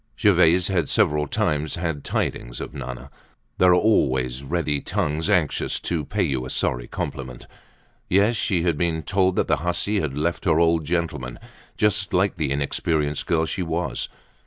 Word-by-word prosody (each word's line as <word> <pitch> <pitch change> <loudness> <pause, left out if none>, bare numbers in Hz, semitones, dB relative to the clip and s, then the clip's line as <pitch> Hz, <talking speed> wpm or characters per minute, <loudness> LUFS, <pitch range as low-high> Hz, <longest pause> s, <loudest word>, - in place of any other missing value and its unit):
Gervaise 90 -4 +4
had 85 -6 0
several 75 0 +2
times 75 +2 -1
had 80 -4 -3
tidings - - -2
of - - -6
Nana. 65 0 -7 0.5
There 90 - +6
are 90 - +6
always 65 - +2
ready 75 -1 -1
tongues 75 +5 -1
anxious 90 -8 +1
to 80 -4 -2
pay - - -1
you 65 -2 -1
a 65 - -6
sorry - - -1
compliment. 65 -2 -5 0.6
Yes, 100 +5 +3
she 90 -5 0
had 85 -4 0
been 80 -2 0
told 95 -2 +1
that - - +1
the - - +2
hussy 90 +5 0
had 75 -5 -3
left 85 +5 -1
her 80 -3 +3
old 85 -2 +3
gentleman, 75 -7 -2 0.4
just 105 -3 +1
like 95 +2 +2
the 75 -3 -1
inexperienced 75 +1 -1
girl 80 -2 +2
she 90 - -3
was. 80 -6 -2
80 Hz, 165 wpm, -23 LUFS, 70-90 Hz, 0.6 s, There